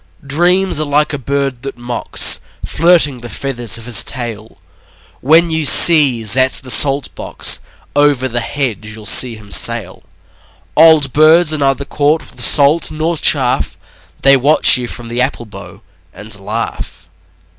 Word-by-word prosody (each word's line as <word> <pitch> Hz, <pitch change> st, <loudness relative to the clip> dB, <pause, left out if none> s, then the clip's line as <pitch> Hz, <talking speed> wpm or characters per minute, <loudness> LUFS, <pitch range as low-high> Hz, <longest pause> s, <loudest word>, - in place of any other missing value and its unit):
Dreams 175 Hz, +5 st, 0 dB
are 155 Hz, -, -1 dB
like 150 Hz, +1 st, -1 dB
a 145 Hz, -, -5 dB
bird 135 Hz, -1 st, -4 dB
that 135 Hz, -2 st, -9 dB
mocks, 120 Hz, 0 st, 0 dB, 0.3 s
Flirting 160 Hz, -5 st, 0 dB
the 120 Hz, 0 st, -11 dB
feathers 120 Hz, -5 st, -3 dB
of 115 Hz, -, -11 dB
his 120 Hz, -3 st, +3 dB
tail. 115 Hz, -3 st, -6 dB, 0.6 s
When 165 Hz, +5 st, +2 dB
you 160 Hz, 0 st, -2 dB
sieze 135 Hz, -, +5 dB
at 130 Hz, 0 st, +2 dB
the 130 Hz, -2 st, -1 dB
salt 135 Hz, +4 st, +2 dB
box, -, -, 0 dB, 0.4 s
Over 145 Hz, -3 st, +1 dB
the 120 Hz, -1 st, -3 dB
hedge 120 Hz, -5 st, -4 dB
you'll 110 Hz, -1 st, -13 dB
see 120 Hz, +1 st, +3 dB
him 105 Hz, -2 st, -16 dB
sail. 115 Hz, 0 st, 0 dB, 0.7 s
Old 155 Hz, -4 st, +3 dB
birds 155 Hz, +1 st, +3 dB
are 155 Hz, -, -3 dB
neither 140 Hz, 0 st, -1 dB
caught 150 Hz, +3 st, -2 dB
with -, -, -11 dB
salt 150 Hz, +3 st, +3 dB
nor 160 Hz, +2 st, -4 dB
chaff: 135 Hz, -4 st, -1 dB, 0.5 s
They 135 Hz, 0 st, +5 dB
watch 140 Hz, +4 st, +3 dB
you 125 Hz, -2 st, -4 dB
from 120 Hz, 0 st, -9 dB
the 120 Hz, +2 st, -3 dB
apple 125 Hz, -2 st, -3 dB
bough 100 Hz, 0 st, -14 dB, 0.3 s
and 105 Hz, -1 st, -4 dB
laugh. 95 Hz, -4 st, -7 dB
135 Hz, 155 wpm, -12 LUFS, 120-150 Hz, 0.7 s, sieze